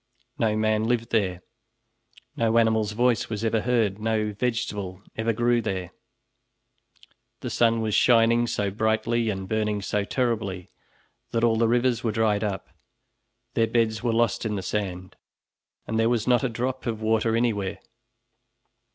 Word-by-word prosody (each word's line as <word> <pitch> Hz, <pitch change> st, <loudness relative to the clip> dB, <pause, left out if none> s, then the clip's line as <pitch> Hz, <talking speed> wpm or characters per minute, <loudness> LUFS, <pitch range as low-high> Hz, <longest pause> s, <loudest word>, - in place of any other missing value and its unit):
No 110 Hz, -2 st, +1 dB
man 110 Hz, 0 st, +1 dB
lived 115 Hz, 0 st, -1 dB
there, 95 Hz, -5 st, 0 dB, 0.9 s
no 115 Hz, 0 st, +1 dB
animal's 110 Hz, -2 st, +2 dB
voice 120 Hz, +1 st, +1 dB
was 110 Hz, 0 st, -3 dB
ever 110 Hz, -1 st, +1 dB
heard, 115 Hz, -5 st, +1 dB
no 110 Hz, -1 st, -1 dB
vegetable 105 Hz, -4 st, -3 dB
ever 110 Hz, +1 st, 0 dB
grew 120 Hz, +1 st, +2 dB
there; 95 Hz, -5 st, -3 dB, 1.5 s
the -, -, -4 dB
sun 115 Hz, -1 st, +2 dB
was 110 Hz, -1 st, -1 dB
shining 115 Hz, +1 st, +4 dB
so 100 Hz, -3 st, -1 dB
brightly 110 Hz, +2 st, 0 dB
and 95 Hz, -2 st, -4 dB
burning 105 Hz, 0 st, 0 dB
so 100 Hz, +1 st, -1 dB
terribly 105 Hz, -6 st, -2 dB, 0.6 s
that 115 Hz, -, -1 dB
all 115 Hz, -1 st, +4 dB
the 115 Hz, 0 st, +3 dB
rivers 120 Hz, +1 st, +1 dB
were 115 Hz, -, +1 dB
dried 110 Hz, -1 st, +1 dB
up, 100 Hz, -3 st, -3 dB, 0.8 s
their 115 Hz, -1 st, +2 dB
beds 110 Hz, -2 st, +1 dB
were 120 Hz, -, 0 dB
lost 115 Hz, 0 st, +1 dB
in 110 Hz, -2 st, -2 dB
the 95 Hz, -, -4 dB
sand, 95 Hz, -2 st, -4 dB, 0.7 s
and 110 Hz, -, -1 dB
there 115 Hz, +1 st, +3 dB
was 120 Hz, -3 st, 0 dB
not 125 Hz, +1 st, +3 dB
a 130 Hz, -, +1 dB
drop 125 Hz, +3 st, -3 dB
of 110 Hz, -2 st, -2 dB
water 110 Hz, +1 st, +2 dB
anywhere. 110 Hz, -5 st, 0 dB
110 Hz, 150 wpm, -25 LUFS, 105-115 Hz, 1.5 s, shining